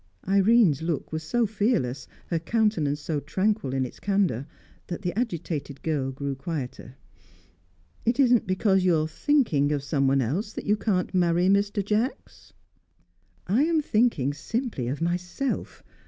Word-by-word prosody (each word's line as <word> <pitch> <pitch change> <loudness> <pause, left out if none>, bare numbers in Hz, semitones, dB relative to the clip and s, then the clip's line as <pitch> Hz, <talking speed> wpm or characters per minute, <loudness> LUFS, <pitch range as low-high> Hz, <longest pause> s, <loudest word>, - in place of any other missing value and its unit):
Irene's 195 - +4
look 165 -3 -3
was 160 - -2
so 230 +9 +1
fearless, 200 - -1 0.2
her 170 - 0
countenance 170 -7 +1
so 150 0 -2
tranquil 190 +2 -1
in 135 0 0
its 125 - -10
candour, 190 - 0 0.4
that 175 +3 -5
the 175 -2 -1
agitated 165 - -3
girl 145 -5 -1
grew 140 +1 -4
quieter. 135 -3 -6 1.1
"It 235 +3 0
isn't 245 -6 +4
because 190 0 +2
you 180 -2 +4
are 155 0 0
thinking 160 - +1
of 145 -2 -1
someone 140 -2 +2
else 180 - -2
that - - -6
you 210 - +3
can't 200 -4 -1
marry 175 0 +3
Mr. 200 0 +1
Jacks?" 215 +5 -2 0.9
"I 220 +10 +2
am 330 -1 +2
thinking 215 - +1
simply 225 - -3
of 140 +5 -3
myself. 180 +10 -3
175 Hz, 145 wpm, -26 LUFS, 145-215 Hz, 1.1 s, Irene's